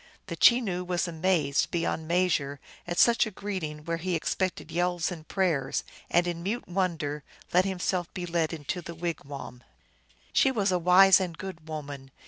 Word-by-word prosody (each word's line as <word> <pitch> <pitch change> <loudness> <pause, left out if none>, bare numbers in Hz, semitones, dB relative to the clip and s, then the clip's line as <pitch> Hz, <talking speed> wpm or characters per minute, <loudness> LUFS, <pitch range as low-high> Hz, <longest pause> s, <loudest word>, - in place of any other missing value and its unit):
The - - -5
Chenoo 210 -8 +4
was 180 0 -1
amazed 160 -4 +1
be 170 - -1
yond 160 -1 -2
measure 165 -5 +1 0.3
at 175 0 -3
such 235 -1 +5
a - - -3
greeting 180 -7 -5
where 170 0 -1
he 180 +1 -2
expected 180 0 -2
yells 175 +1 0
and 160 -3 -8
prayers, 170 -9 0 0.3
and 175 +1 +3
in 170 -1 -3
mute 210 +7 -3
wonder 170 -6 -2 0.3
let 180 +1 +5
himself 180 -2 -1
be 180 - -3
led 165 -2 0
into 165 +3 -4
the 170 0 -8
wigwam. 145 -7 -6 0.7
She - - +5
was 205 -7 +1
a 180 - +2
wise 185 +3 +7
and 175 -4 -3
good 175 -4 -8
woman. 145 -3 -6
175 Hz, 170 wpm, -28 LUFS, 160-185 Hz, 0.7 s, wise